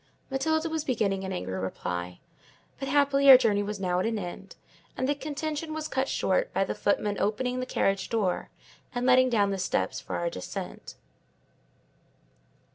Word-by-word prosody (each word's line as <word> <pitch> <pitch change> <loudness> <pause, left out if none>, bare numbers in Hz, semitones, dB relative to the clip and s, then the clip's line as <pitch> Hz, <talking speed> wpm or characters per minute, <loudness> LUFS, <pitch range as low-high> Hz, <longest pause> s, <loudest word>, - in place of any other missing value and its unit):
Matilda 315 +4 +1
was 320 -2 -2
beginning 200 -8 0
an 190 - -4
angry 95 - -3
reply; 90 -1 -4 0.6
but, 270 - -4
happily, 280 0 +4
our 260 - +13
journey 210 -5 +2
was 205 0 -4
now 180 -2 0
at - - 0
an 225 -1 -1
end; 190 0 -7 0.4
and 260 - 0
the 290 - +2
contention 305 +2 -4
was 310 -1 -3
cut 265 -2 -1
short - - 0
by - - +3
the - - -2
footman 205 -1 0
opening 250 +5 0
the 255 - -3
carriage 195 -5 0
door, 205 -6 -1 0.5
and 245 0 -1
letting 255 0 +5
down 205 -4 +2
the 195 - -2
steps 185 - -1
for - - -6
our 170 0 -1
descent. 90 - -7
230 Hz, 170 wpm, -28 LUFS, 195-275 Hz, 0.6 s, our